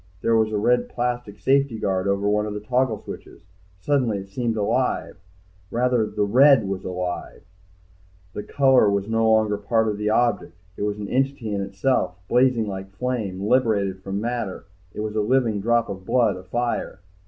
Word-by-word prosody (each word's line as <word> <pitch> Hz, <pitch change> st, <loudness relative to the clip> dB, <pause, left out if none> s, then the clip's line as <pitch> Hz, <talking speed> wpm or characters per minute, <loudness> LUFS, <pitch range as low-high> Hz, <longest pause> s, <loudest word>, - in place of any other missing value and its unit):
There 115 Hz, -, +2 dB
was 110 Hz, -1 st, +2 dB
a 105 Hz, -, 0 dB
red 120 Hz, +4 st, +2 dB
plastic 120 Hz, -4 st, -3 dB
safety 135 Hz, +2 st, +2 dB
guard 95 Hz, -2 st, -1 dB
over 100 Hz, +1 st, 0 dB
one 105 Hz, +1 st, +1 dB
of 105 Hz, -, -5 dB
the -, -, -3 dB
toggle 125 Hz, +1 st, 0 dB
switches. -, -, -11 dB, 0.4 s
Suddenly 125 Hz, -2 st, +1 dB
it 95 Hz, 0 st, -8 dB
seemed 115 Hz, +2 st, -2 dB
alive, 115 Hz, +5 st, 0 dB, 0.5 s
rather 120 Hz, -1 st, +1 dB
the 105 Hz, -, -1 dB
red 125 Hz, +1 st, +5 dB
was 95 Hz, -1 st, -4 dB
alive, 90 Hz, -1 st, -5 dB, 0.9 s
the -, -, -4 dB
color 130 Hz, -3 st, +3 dB
was 100 Hz, 0 st, -1 dB
no 115 Hz, 0 st, +2 dB
longer 110 Hz, -2 st, +2 dB
part 110 Hz, +2 st, +1 dB
of 105 Hz, -1 st, -2 dB
the 105 Hz, 0 st, 0 dB
object, 110 Hz, -6 st, 0 dB, 0.2 s
it -, -, -9 dB
was 105 Hz, 0 st, -1 dB
an 105 Hz, -1 st, -5 dB
entity 130 Hz, -4 st, -1 dB
in 100 Hz, -, -1 dB
itself, 95 Hz, -1 st, 0 dB
blazing 125 Hz, -3 st, +2 dB
like 95 Hz, -1 st, -6 dB
flame, 110 Hz, -6 st, -3 dB
liberated 105 Hz, -7 st, +1 dB
from 95 Hz, +1 st, -4 dB
matter, 115 Hz, -4 st, -4 dB, 0.3 s
it 105 Hz, -, -6 dB
was 110 Hz, 0 st, -4 dB
a 110 Hz, -, +2 dB
living 115 Hz, -2 st, +1 dB
drop 120 Hz, +2 st, +2 dB
of 95 Hz, -2 st, -7 dB
blood, 115 Hz, 0 st, +2 dB
afire. 95 Hz, +1 st, -3 dB
110 Hz, 175 wpm, -23 LUFS, 100-120 Hz, 0.9 s, red